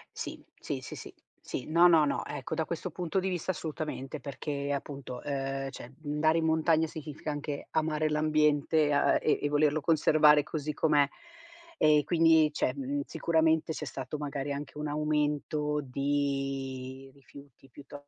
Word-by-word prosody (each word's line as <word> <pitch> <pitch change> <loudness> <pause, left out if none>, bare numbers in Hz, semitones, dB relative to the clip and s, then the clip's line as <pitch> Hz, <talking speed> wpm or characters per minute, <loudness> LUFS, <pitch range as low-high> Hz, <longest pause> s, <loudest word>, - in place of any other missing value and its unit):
Sì, - - -6 0.2
sì, - - -4
sì, - - -8
sì, - - -10 0.3
sì - - -5
no, 170 +3 +6
no, 165 -3 +6
no, 145 - -1
ecco, - - -5
da 160 0 0
questo 170 +3 -4
punto 175 +2 -2
di 190 +1 -1
vista, 180 0 -1
assolutamente, 155 -4 -5
perché 140 0 -4
appunto, 135 -3 -6
ehm, 135 -1 -3
cioè 130 -1 -10
andare 155 +2 +2
in 160 - 0
montagna 160 0 +3
significa 150 -1 -6
anche 145 0 -5
amare 155 -1 0
l'ambiente, 150 0 +2
a 145 0 +3
e 155 - +2
e 145 - +1
volerlo 150 +1 +2
conservare 150 -1 +5
così 155 -1 -4
com'è. 145 -2 +3 0.7
E 150 -1 +4
quindi 160 -2 +4
cioè, 130 -3 0
mhmm, 140 +1 -2
sicuramente 160 -1 +1
c'è 150 - -4
stato 130 +4 -5
magari 145 -1 -4
anche 140 0 -6
un 150 0 -3
aumento 150 0 0
di 135 -1 -2
rifiuti, 140 -1 -16
piuto 145 +2 -12
150 Hz, 155 wpm, -30 LUFS, 140-155 Hz, 0.7 s, no